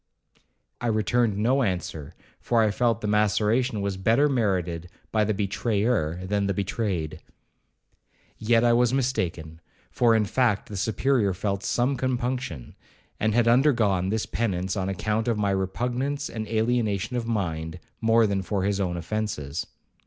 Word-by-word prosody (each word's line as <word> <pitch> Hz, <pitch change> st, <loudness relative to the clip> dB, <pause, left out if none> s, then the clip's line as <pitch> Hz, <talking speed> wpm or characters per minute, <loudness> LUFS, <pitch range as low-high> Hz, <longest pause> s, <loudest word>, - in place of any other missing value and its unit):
I 120 Hz, -, -1 dB
returned 110 Hz, 0 st, +1 dB
no 125 Hz, +6 st, +2 dB
answer, 90 Hz, -, -3 dB, 0.2 s
for 115 Hz, -2 st, +2 dB
I 110 Hz, -, +2 dB
felt 115 Hz, +1 st, +1 dB
the 105 Hz, -, -2 dB
maceration 105 Hz, +3 st, +2 dB
was 100 Hz, -1 st, -2 dB
better 115 Hz, +9 st, +3 dB
merited 90 Hz, -, -1 dB, 0.2 s
by 110 Hz, -1 st, +2 dB
the 110 Hz, +1 st, 0 dB
betrayer 100 Hz, -4 st, 0 dB
than 100 Hz, +1 st, 0 dB
the 100 Hz, -, -1 dB
betrayed. 90 Hz, -6 st, -2 dB, 1.2 s
Yet 115 Hz, +1 st, +3 dB
I 120 Hz, -1 st, +4 dB
was 120 Hz, +1 st, +3 dB
mistaken; 85 Hz, -11 st, -2 dB, 0.3 s
for 115 Hz, -2 st, +3 dB
in 110 Hz, -1 st, +2 dB
fact, 115 Hz, -1 st, +1 dB
the 105 Hz, -, -6 dB
Superior 110 Hz, 0 st, +1 dB
felt 100 Hz, 0 st, -2 dB
some 125 Hz, +7 st, 0 dB
compunction, 125 Hz, -, -3 dB, 0.5 s
and 110 Hz, 0 st, +1 dB
had 120 Hz, -1 st, +3 dB
undergone 115 Hz, -8 st, +3 dB
this 110 Hz, +1 st, -1 dB
penance 95 Hz, -5 st, -2 dB
on 95 Hz, -1 st, -1 dB
account 105 Hz, +3 st, -1 dB
of 115 Hz, -2 st, +1 dB
my 100 Hz, -1 st, +1 dB
repugnance 125 Hz, +9 st, -2 dB
and 110 Hz, -1 st, -5 dB
alienation 110 Hz, -1 st, 0 dB
of 120 Hz, -2 st, -2 dB
mind, 85 Hz, -7 st, -2 dB, 0.2 s
more 115 Hz, 0 st, +4 dB
than 100 Hz, -2 st, 0 dB
for 95 Hz, +1 st, -2 dB
his 100 Hz, 0 st, 0 dB
own 90 Hz, -3 st, -1 dB
offences. 85 Hz, -6 st, -3 dB
105 Hz, 150 wpm, -25 LUFS, 95-120 Hz, 1.2 s, I